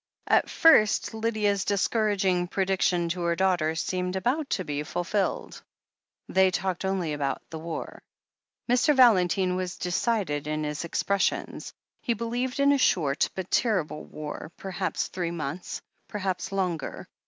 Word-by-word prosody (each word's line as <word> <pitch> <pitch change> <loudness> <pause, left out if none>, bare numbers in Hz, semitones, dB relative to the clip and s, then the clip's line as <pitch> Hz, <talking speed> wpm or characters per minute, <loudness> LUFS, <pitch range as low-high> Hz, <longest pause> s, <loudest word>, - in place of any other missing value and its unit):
At - - +3
first 225 -10 +4
Lydia' 220 -2 +1
s 200 -1 -1
discouraging 200 -3 +1
prediction 185 -2 +1
to 175 +1 -2
her 170 0 +1
daughter 175 -4 +1
seemed 180 +2 -2
about 260 +10 0
to 185 - -1
be 145 0 -2
fulfilled. 175 +6 -2 0.7
They 190 0 +4
talked 185 0 -2
only 185 -5 -1
about 145 -2 -2
the 160 - -5
war. 165 0 -6 0.7
Mr. 250 +5 +3
Valentine 185 -7 +4
was 185 0 -3
decided 180 -5 -1
in 155 0 -2
his 150 +2 -3
expressions. 200 +3 -1 0.3
He 235 - 0
believed 245 +4 -2
in 280 0 +5
a 285 - +3
short 150 - +2
but 190 -1 -5
terrible 185 -10 +1
war 155 +1 -7
— - - -46
^perhaps 190 -3 -2
three 175 -2 -3
months, 170 +1 -5 0.2
perhaps 190 -2 -3
longer. 180 -7 -3
185 Hz, 140 wpm, -27 LUFS, 170-210 Hz, 0.7 s, in